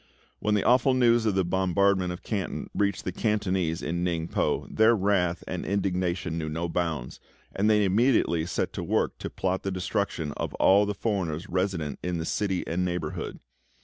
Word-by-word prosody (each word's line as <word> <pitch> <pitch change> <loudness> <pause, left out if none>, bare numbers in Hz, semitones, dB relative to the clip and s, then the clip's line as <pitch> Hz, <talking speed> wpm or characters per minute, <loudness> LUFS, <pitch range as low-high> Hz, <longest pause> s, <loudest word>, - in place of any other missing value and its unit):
When 105 0 +1
the 100 - +1
awful 130 +2 +4
news 120 -2 +4
of 105 - +1
the 95 -2 +2
bombardment 95 +1 +2
of 90 - -7
Canton 100 -4 -3
reached 100 -1 0
the 90 - -2
Cantonese 95 -5 0
in 85 +1 -2
Ningpo 85 -2 -1
their 110 +2 +5
wrath 95 -4 +1
and - - -3
indignation 90 -3 -1
knew 80 -1 -3
no 80 +3 -2
bounds, 80 -7 -3 0.4
and 105 +2 +2
they 105 -1 +4
immediately 95 -5 +2
set - - -2
to - - -4
work - - 0
to - - -4
plot 95 0 -1
the 95 - -3
destruction 90 -4 -2
of - - -3
all 100 +2 +5
the 105 - -2
foreigners 95 -5 -2
resident 90 -6 -1
in 90 -1 -2
the 80 - -3
city 95 0 -1
and 90 +2 -1
neighbourhood. 90 -4 -3
95 Hz, 180 wpm, -27 LUFS, 85-100 Hz, 0.4 s, their